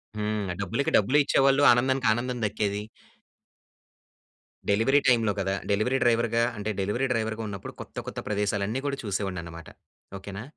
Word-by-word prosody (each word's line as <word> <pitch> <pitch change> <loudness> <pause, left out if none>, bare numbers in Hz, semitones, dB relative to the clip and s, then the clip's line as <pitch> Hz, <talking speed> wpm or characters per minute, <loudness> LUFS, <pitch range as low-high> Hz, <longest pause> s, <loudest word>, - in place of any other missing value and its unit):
హ్మ్. 105 -1 -2 0.2
డబ్బులకి 100 +9 -1
డబ్బులె 130 +8 +3
ఇచ్చేవాళ్ళు, 135 0 +3
ఆనందానికి 130 +2 +2
ఆనందం 125 +2 -3
దక్కేది. 105 -1 -1 1.9
డెలివరీ 115 +8 +4
టైమ్‌లో 115 -4 +4
గదా! 95 0 0 0.2
డెలివరీ 110 +6 +1
డ్రైవర్‌గా 115 -1 +2
అంటే 105 +1 -3
డెలివరీ 105 +7 0
డ్రైవర్‌గా 110 -1 -1
ఉన్నప్పుడు 100 -2 -7
కొత్త, - - -12
కొత్త - - -5
ప్రదేశాలన్నీ 105 +2 -1
గూడా 140 -1 -1
చూసేవాడిని 95 -3 -3
అన్నమాట. 85 -1 -10 0.5
ఓకే‌నా! 100 +2 -8
110 Hz, 130 wpm, -26 LUFS, 100-125 Hz, 1.9 s, డెలివరీ